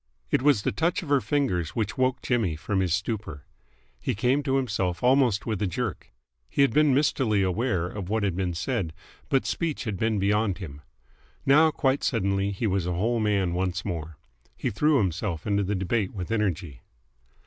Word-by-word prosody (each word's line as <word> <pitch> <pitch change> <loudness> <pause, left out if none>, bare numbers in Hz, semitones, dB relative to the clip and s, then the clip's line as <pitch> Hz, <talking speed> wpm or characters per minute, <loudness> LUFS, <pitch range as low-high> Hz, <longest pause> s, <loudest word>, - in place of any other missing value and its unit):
It - - +3
was 135 -7 +3
the - - +1
touch 170 +2 0
of 155 - -9
her 140 -2 +4
fingers 110 - -1
which 110 -2 -1
woke 130 0 0
Jimmy 110 -10 +1
from 95 +5 -2
his 95 -2 0
stupor. 95 -5 -3 0.5
He - - -2
came 125 +7 +2
to 135 -2 0
himself 100 -9 -1
almost 125 -5 +3
with 110 -4 -2
a 105 - +1
jerk. 105 +3 -4 0.4
He 140 - +3
had 135 - +2
been 150 +1 +4
mistily 125 -8 +2
aware 95 -1 0
of 95 0 -6
what 110 0 0
had 95 -4 0
been 90 -2 -2
said, 95 - -2 0.4
but 135 - +2
speech 165 -4 -2
had 105 -6 -3
been 110 +2 0
beyond 100 0 +1
him. 75 -7 -8 0.6
Now, 155 +4 +6
quite 135 -2 0
suddenly, 100 -4 +1
he 100 +3 -3
was 95 -4 0
a 90 - 0
whole 115 +7 0
man 100 -5 +1
once 90 0 -2
more. 80 -5 -5 0.4
He - - -2
threw 150 +7 +3
himself 95 - -1
into 100 -1 +1
the 100 +1 -1
debate 95 +2 -1
with 90 +1 -5
energy. 90 - -1
105 Hz, 190 wpm, -26 LUFS, 90-125 Hz, 0.6 s, Now